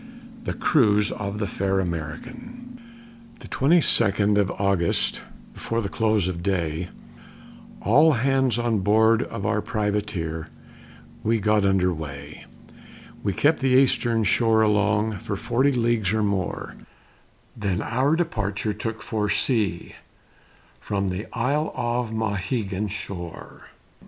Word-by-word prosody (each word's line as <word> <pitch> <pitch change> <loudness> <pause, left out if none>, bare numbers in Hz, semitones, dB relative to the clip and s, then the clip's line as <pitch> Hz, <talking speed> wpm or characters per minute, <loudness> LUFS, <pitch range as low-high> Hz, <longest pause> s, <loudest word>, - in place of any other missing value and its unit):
THE - - -3
CRUISE 105 -8 +3
OF 100 0 -4
THE 105 - -1
FAIR 95 0 -1
AMERICAN 230 - -7 0.6
The - - -11
twenty 160 +6 +3
second 105 -4 +4
of 100 -2 +1
August, 100 -4 +2 0.3
Before 115 - -3
the 100 -4 -3
close 110 -4 +1
of 90 -2 -4
day, 90 -2 -2 0.9
All 150 - +5
hands 130 -1 +1
on 120 -3 0
board 110 +4 +3
of 100 - -5
our 105 +1 +1
privateer, 105 -8 -2 0.8
We 115 +1 +1
got 105 0 +2
her - - +4
under 90 -2 +2
weigh; 75 -2 -8 0.7
We 100 - -1
kept 145 - +2
the 135 - +1
Eastern 125 -3 +3
shore 110 +2 +3
along, 105 0 +1
For 110 -3 -4
forty 130 +7 +1
leagues 115 -6 +1
or 110 -1 +1
more, 95 -11 -2 0.8
Then 100 -5 -2
our 130 +6 +1
departure 105 - -2
took 110 +2 -5
for 105 -2 -2
sea, 105 -8 -1 0.9
From 100 -2 -2
the 95 +4 -4
isle 140 +6 -1
of 120 0 -1
Mauhegan 105 -1 -2
shore. 95 -4 -8
105 Hz, 125 wpm, -24 LUFS, 95-120 Hz, 0.9 s, All